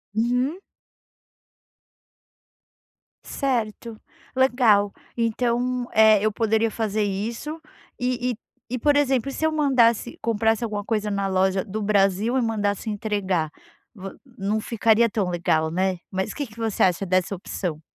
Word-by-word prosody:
Uhum. 250 +9 0 2.6
Certo, 230 -4 -3 0.4
legal, 240 -6 +4 0.2
então, 245 +2 0
eh, 215 -1 +6
eu 215 - +2
poderia 225 +1 +1
fazer 215 -1 -1
isso 230 +11 -4 0.4
e 250 0 -1
e - - -4 0.4
e, 250 - -1
por 290 +4 +3
exemplo, 275 -3 +2
se 315 - -2
eu 315 - +2
mandasse 250 -6 +2
comprasse 225 0 +1
alguma 210 -3 -3
coisa 210 -2 -1
na 200 0 -1
loja 190 0 +1
do 215 +1 -4
Brasil 205 +4 +2
e - - +2
mandasse 215 -2 -1
entregar, 200 -7 -1 0.4
vo 195 -2 -9 0.2
não 205 +2 -1
ficaria 230 0 +3
tão 205 -4 -1
legal, 160 -2 +1
né? 185 +1 0
Mas 190 0 -2
o - - -10
quê 290 -3 -3
que 215 0 -17
você 225 -3 -2
acha 185 +1 +2
dessa 185 +2 +1
opção? 170 -3 -5
220 Hz, 135 wpm, -24 LUFS, 195-240 Hz, 2.6 s, eh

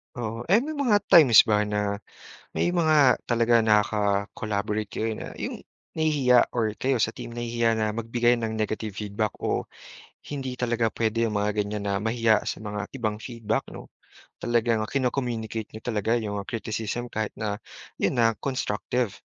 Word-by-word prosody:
Oo, 115 -1 -4
eh, 210 - +7
may 310 +4 -4
mga 245 -8 +3
times 135 -10 +8
ba 105 -1 +3
na 105 -1 -1 0.6
may 175 - +1
mga 155 -7 +4
talaga 120 0 +4
naka-collaborate 105 0 0
kayo 110 +2 -2
na - - -7
'yung - - -5 0.3
nahihiya 145 -6 +3
or 110 -3 +1
kayo 135 0 +2
sa 110 0 +1
team 120 - -8
nahihiya 115 -1 0
na 110 -1 0
magbigay 115 +2 +1
ng 110 -1 -2
negative 110 -1 -3
feedback 105 0 -2
o - - -1 0.6
hindi 130 -3 -5
talaga 120 -2 +1
puwede 115 +1 0
'yung 110 -2 0
mga 105 +1 +1
ganiyan 105 0 -4
na 100 0 -1
mahiya 115 -1 +2
sa - - -4
mga 105 -1 -5
ibang 110 -5 -3
feedback, 115 -3 -2
'no? - - -9 0.5
Talagang 115 -2 +1
kino-communicate 120 -5 -2
niyo 110 - -8
talaga 115 0 0
'yong 105 -1 -3
criticism 115 +1 -4
kahit 110 -1 -3
na 105 -1 -3 0.4
'yon - - +1
na 115 -3 +2
constructive. 125 -3 -2
115 Hz, 155 wpm, -26 LUFS, 105-120 Hz, 0.6 s, times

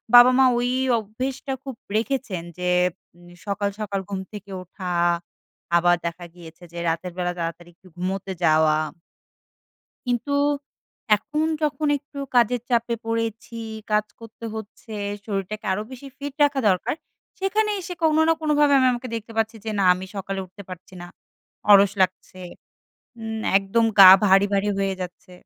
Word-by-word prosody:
বাবা-মা 255 +2 +8
ওই 245 +1 0 0.3
অভ্যেসটা 255 +6 -4
খুব 270 -3 -6 0.2
রেখেছেন 225 -8 -2
যে, 180 0 -1 0.6
নে 175 - -15
সকাল, 200 0 -1
সকাল 200 -2 -2
ঘুম 195 -1 -3
থেকে 200 -1 -9
ওঠা। 180 0 -7 0.9
আবার 175 +1 +4
দেখা 170 +1 -4
গিয়েছে 170 0 -13
যে - - -8
রাতের 170 +2 -3
বেলা 175 0 -1
তাড়াতাড়ি 170 +1 -5
একটু 185 - -21
ঘুমোতে 190 +2 -3
যাওয়া। 155 -1 +4 1.3
কিন্তু, 245 +3 -1 0.9
এখন 305 +7 -2 0.2
যখন 300 0 0
একটু 280 +1 -13 0.2
কাজের 240 0 +3
চাপে 235 0 +1
পড়েছি, 230 0 -3 0.3
কাজ 210 0 +2
করতে 230 0 -12
হচ্ছে। 220 +1 -9 0.3
শরীরটাকে 210 +1 -4
আরো 210 +3 -1
বেশি 260 +2 -10
ফিট 285 -1 -6
রাখা 280 -2 +1
দরকার। 185 +8 +1 0.4
সেখানে 420 +3 +1
এসে 360 0 -6
কোনো 315 0 +4
না - - +6
কোনোভাবে 295 -2 +3
আমি 260 - +4
আমাকে 245 +1 -5
দেখতে 225 0 -6
পাচ্ছি 225 0 0
যে 220 - -3
না 195 - +2
আমি 185 +1 -7
সকালে 195 0 -3
উঠতে 200 +3 -13
পারছি 185 0 -10
না। - - -8 0.7
অলস 200 0 +7
লাগছে, 185 0 -2 0.8
উম 220 0 -4 0.2
একদম 200 +4 +1
গা 190 -1 +12 0.2
ভারি, 195 +1 +5
ভারি 200 +1 +1
হয়ে 195 -1 0
যাচ্ছে 180 +1 -8
210 Hz, 150 wpm, -23 LUFS, 185-250 Hz, 1.3 s, গা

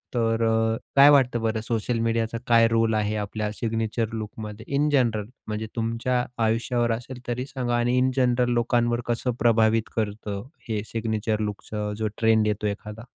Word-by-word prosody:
तर 115 -1 +1
अ, 110 0 +2 0.2
काय 140 +1 +9
वाटतं 125 -5 +4
बरं 110 0 -1
सोशल 115 +1 -1
मीडियाचा 115 0 -1
काय 115 -1 +6
रोल 115 -1 +2
आहे 105 0 0
आपल्या 105 0 -3
सिग्नेचर 115 0 -2
लूकमध्ये 110 0 -6
इन 150 +2 +2
जनरल 120 -7 +2 0.2
म्हणजे 110 0 -3
तुमच्या 115 +2 0 0.2
आयुष्यावर 115 +1 +1
असेल 125 +2 -6
तरी 125 +1 -2
सांगा 125 -3 -2
आणि 120 +1 +1
इन 130 +1 +3
जनरल 125 -1 +2
लोकांवर 120 0 +1
कसं 120 +1 0
प्रभावित 115 -1 +3
करतं 105 -2 -3 0.3
हे 105 -2 -1
सिग्नेचर 110 -1 -2
लूकच 105 -1 -5 0.3
जो 110 - 0
ट्रेंड 110 -1 +3
येतो 105 0 -1
एखादा? 105 +1 -5
115 Hz, 160 wpm, -25 LUFS, 110-120 Hz, 0.3 s, काय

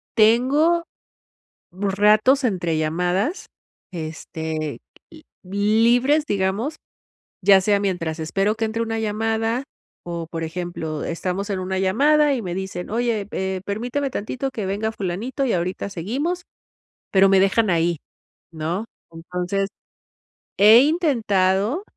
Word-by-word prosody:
tengo 275 +10 +4 0.9
ratos, 210 +7 +3
entre 175 -8 0
llamadas, 180 - -1 0.5
este, 160 -2 -5 0.6
libres, 230 +9 +3
digamos, 205 +8 -1 0.7
ya 195 0 +7
sea 200 +1 +2
mientras 170 -5 -2
espero 195 +7 0
que 225 - -1
entre 225 +1 -3
una 225 -1 -2
llamada 225 +3 -1 0.4
o, 170 -1 -5
por 165 -1 -5
ejemplo, 160 -2 -4
estamos 185 +4 -3
en 195 - -1
una 190 +1 -2
llamada 290 +11 +3
y 255 - -2
me 175 -2 -4
dicen: 190 -1 -5
"Oye, 225 -3 -1
eh, 190 0 -2
permíteme 245 +7 -2
tantito 250 +6 -3
que 220 -5 -5
venga 210 +3 -2
fulanito 215 +9 -3
y 250 - +1
ahorita 180 +3 -2
seguimos". 275 - -3 0.7
Pero 195 0 +5
me 195 - +5
dejan 195 +3 +3
ahí, 170 -1 +1 0.5
¿no? 165 +6 -3 0.3
Entonces 180 +4 -3 0.9
he 215 +4 +8
intentado 230 - +1
200 Hz, 115 wpm, -22 LUFS, 180-235 Hz, 0.9 s, he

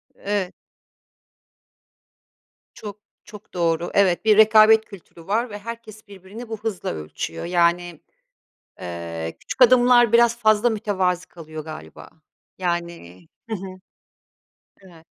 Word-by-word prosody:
Evet. 200 -3 -3 2.2
Çok, 210 -1 -9 0.2
çok 210 -1 -14
doğru. 170 -1 -1
Evet, 190 -2 +2
bir 215 -1 +5
rekabet 220 0 +6
kültürü 175 -5 -15
var 230 +5 0
ve 205 -1 -8
herkes 220 -1 -10
birbirini 200 +4 -11
bu 225 - -4
hızla 215 -4 -4
ölçüyor. 80 - -6
Yani, 175 -1 0 0.8
eee, 85 -2 -6
küçük 260 - -2
adımlar 245 -1 +5
biraz 235 0 +4
fazla 215 +1 +3
mütevazı 185 -4 -1
kalıyor 155 -2 -10
galiba. 155 0 -10 0.5
Yani 170 - -4 0.2
Hı 220 - -1
hı, 195 - -8 1.2
evet. 170 -4 -18
195 Hz, 110 wpm, -22 LUFS, 170-220 Hz, 2.2 s, rekabet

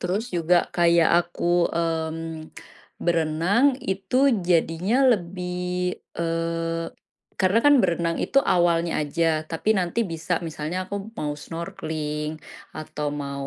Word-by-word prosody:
Terus 200 +7 -2
juga 170 +1 +3
kayak 170 -1 +4
aku, 175 0 0
mmm, 165 -1 -1 0.8
berenang, 175 - +2
itu 195 +4 -2 0.3
jadinya 175 +5 +1 0.2
lebih, 180 0 -3 0.2
eee 165 0 -2 0.5
karena 190 +4 +4
kan 290 0 +7
berenang 170 -2 0
itu 275 - +2
awalnya 170 -7 +2
aja. 165 +3 0 0.2
Tapi 210 +7 +1
nanti 180 +5 -1
bisa, 165 +1 -1
misalnya 165 +4 -4
aku 200 - -4 0.2
mau 150 -1 -2
snorkeling 155 -1 -5 0.4
atau 150 -1 -5
mau 140 -1 -5
170 Hz, 110 wpm, -24 LUFS, 160-180 Hz, 0.8 s, kan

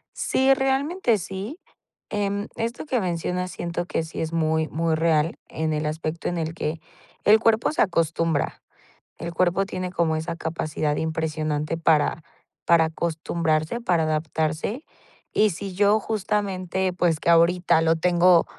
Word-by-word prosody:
Sí, 265 +1 +2
realmente 270 - +1
sí, 195 - -6 0.5
em, 205 0 -1
esto 230 +1 -3
que 265 -5 0
mencionas 180 0 -2
siento 175 0 -4
que - - -1
sí 160 0 -7
es 160 0 -3
muy, 160 -1 +1
muy 165 0 0
real 160 0 +1
en 160 0 -2
el 150 0 -1
aspecto 155 +1 -3
en 175 - -2
el 160 0 -3
que 160 0 -3 0.4
el 215 +1 +7
cuerpo 225 +2 +2
se - - -1
acostumbra. 165 -3 0 0.6
El 170 - -5
cuerpo 180 +3 +2
tiene 185 -2 -4
como 165 -3 +1
esa 160 +1 -4
capacidad 155 -2 -2
impresionante 155 -1 -2
para 160 -1 +2 0.4
para 165 -1 +5
acostumbrarse, 160 +3 -1
para 180 -8 +1
adaptarse. 155 - -1 0.5
Y 215 0 +3
si 195 +2 -6
yo 205 +2 +4
justamente, 190 -3 -1
pues, 170 -3 +1
que - - +2
ahorita 170 0 +4
lo 165 0 +3
tengo 175 +1 +4
170 Hz, 145 wpm, -24 LUFS, 160-195 Hz, 0.6 s, el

